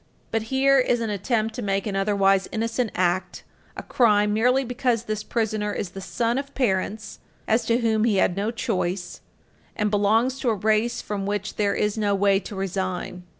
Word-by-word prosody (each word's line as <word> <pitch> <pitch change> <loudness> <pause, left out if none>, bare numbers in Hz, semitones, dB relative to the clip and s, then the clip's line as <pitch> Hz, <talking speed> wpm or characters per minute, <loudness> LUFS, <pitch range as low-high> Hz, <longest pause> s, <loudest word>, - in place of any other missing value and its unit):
But 225 - 0
here 270 +1 +4
is 245 -1 +2
an 225 -2 -2
attempt 220 +2 -1
to 245 - -5
make 195 -2 -1
an 205 -2 -3
otherwise 195 -1 +2
innocent 230 +1 -1
act 180 0 -1 0.3
a - - -5
crime 210 -4 +3
merely 250 +5 +3
because 245 -2 0
this 215 -2 -3
prisoner 215 -2 -1
is 180 - -4
the 195 - -8
son 235 +5 -1
of 280 0 -8
parents 210 -3 -1 0.3
as 225 +1 +2
to 235 +2 +1
whom 220 -1 +2
he 220 -3 +2
had 185 -2 +2
no 200 +2 -1
choice, 185 -6 -3 0.5
and 210 -1 0
belongs 225 +6 +2
to 255 - 0
a 225 - +1
race 220 +3 0
from 200 -2 -4
which 205 0 -3
there 205 -1 +1
is 210 +1 0
no 205 -1 +1
way 195 0 +3
to 205 - -9
resign. 185 -1 -4
215 Hz, 190 wpm, -24 LUFS, 195-230 Hz, 0.5 s, here